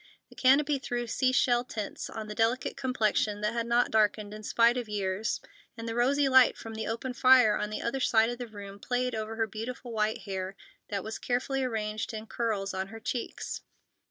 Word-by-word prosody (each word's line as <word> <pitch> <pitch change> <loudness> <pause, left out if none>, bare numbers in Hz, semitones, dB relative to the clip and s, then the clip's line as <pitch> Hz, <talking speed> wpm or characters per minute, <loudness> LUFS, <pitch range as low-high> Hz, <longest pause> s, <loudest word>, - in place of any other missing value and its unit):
The - - -16
canopy 280 +2 +4
threw 245 -1 -3
sea 255 +2 +1
shell 245 -2 +3
tints 220 -5 -5
on 220 -1 -6
the 210 - -5
delicate 230 +4 0
complexion 215 -5 0
that 210 +2 0
had 235 0 -2
not 240 +1 +2
darkened 210 -1 +2
in 215 - -8
spite 230 +3 +3
of 245 -3 -3
years, 200 +1 -1 0.4
and 230 0 -6
the 225 - -2
rosy 270 +4 +3
light 260 -1 +6
from 225 - -8
the 220 0 -4
open 230 +3 -3
fire 250 -4 +6
on 210 - -2
the 215 - -4
other 235 +3 -1
side 225 -2 +3
of 240 - -6
the 245 - -5
room 200 -2 -10
played 250 +2 -1
over 220 0 -3
her 225 0 +1
beautiful 230 +3 -6
white 215 -1 0
hair 190 -1 -4 0.3
that 200 -2 -2
was 220 0 -5
carefully 260 +2 -1
arranged 220 -2 -2
in 215 0 -6
curls 215 -4 -2
on 190 0 -2
her 225 +3 -9
cheeks. 245 +1 -4
225 Hz, 205 wpm, -29 LUFS, 215-250 Hz, 0.4 s, light